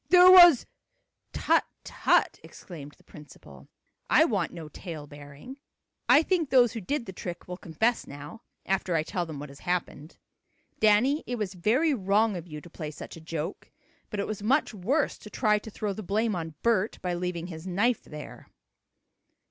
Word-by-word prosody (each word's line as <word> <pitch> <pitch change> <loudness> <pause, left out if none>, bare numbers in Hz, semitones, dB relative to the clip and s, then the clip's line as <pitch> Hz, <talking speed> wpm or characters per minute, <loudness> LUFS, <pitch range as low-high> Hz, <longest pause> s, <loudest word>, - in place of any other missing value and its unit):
"There 360 +1 +8
was 350 -7 +9 0.3
" - - -49 0.3
"Tut - - +2 0.2
Tut!" - - +1
exclaimed 150 -5 -11
the - - -25
principal. 100 - -15 0.4
"I - - +6
want - - -1
no 165 -3 -8
tale 155 -1 -8
bearing. 145 - -12 0.5
I 305 - +7
think 335 -4 0
those 245 -4 +4
who 225 - -5
did 265 +6 -2
the 190 - -8
trick 175 -1 -7
will 180 - -5
confess 190 +8 -1
now, 145 +10 -10 0.2
after 190 -2 -1
I 155 - +1
tell 175 +1 -3
them 155 -3 -7
what 145 0 -8
has 140 +1 -13
happened. 175 -3 -4 0.6
Danny, 230 +8 +3
it 245 - -2
was 210 -4 -3
very 245 - +2
wrong 210 -1 +1
of 175 -1 -7
you 150 -2 -8
to - - -13
play 155 -3 -6
such 150 - -10
a 165 - -12
joke, 160 -1 -6 0.4
but 210 - -5
it 200 - -1
was 215 -2 -5
much 255 +5 +1
worse 240 - -1
to 210 - -11
try 210 -2 +1
to 220 - -10
throw 210 -1 -3
the 215 - -7
blame 215 +2 0
on 160 -3 -5
Bert 225 -3 +1
by 180 -1 -1
leaving 175 -1 -3
his 170 0 -8
knife 210 +7 +1
there." 150 -1 -11
190 Hz, 185 wpm, -27 LUFS, 160-230 Hz, 0.6 s, was